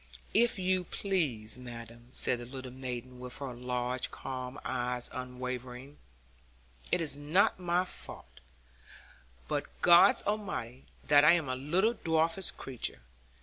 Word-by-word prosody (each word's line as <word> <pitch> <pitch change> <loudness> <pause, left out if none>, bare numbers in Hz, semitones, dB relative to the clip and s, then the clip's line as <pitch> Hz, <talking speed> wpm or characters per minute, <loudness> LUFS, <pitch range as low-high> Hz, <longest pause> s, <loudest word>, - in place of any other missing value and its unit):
'If 235 0 +5
you 185 0 +1
please, 140 - -1
madam,' 120 -1 -10
said 125 - 0
the 120 - -7
little 130 0 -7
maiden, 125 -1 -6
with 125 0 -4
her 135 -3 -5
large 125 +1 -2
calm 130 +1 -6
eyes 125 -1 -1
unwavering, 125 +1 -6 0.9
'it - - +3
is 155 -4 +1
not 155 +7 +3
my 180 0 +1
fault, - - -8 1.1
but - - -1 0.2
God 175 +3 +8
Almighty's, 180 - -3 0.2
that 145 0 +6
I 155 +3 +8
am 165 -5 +1
a 130 - -1
little 175 - +2
dwarfish 165 -1 +1
creature. 120 - -4
130 Hz, 130 wpm, -31 LUFS, 125-170 Hz, 1.1 s, God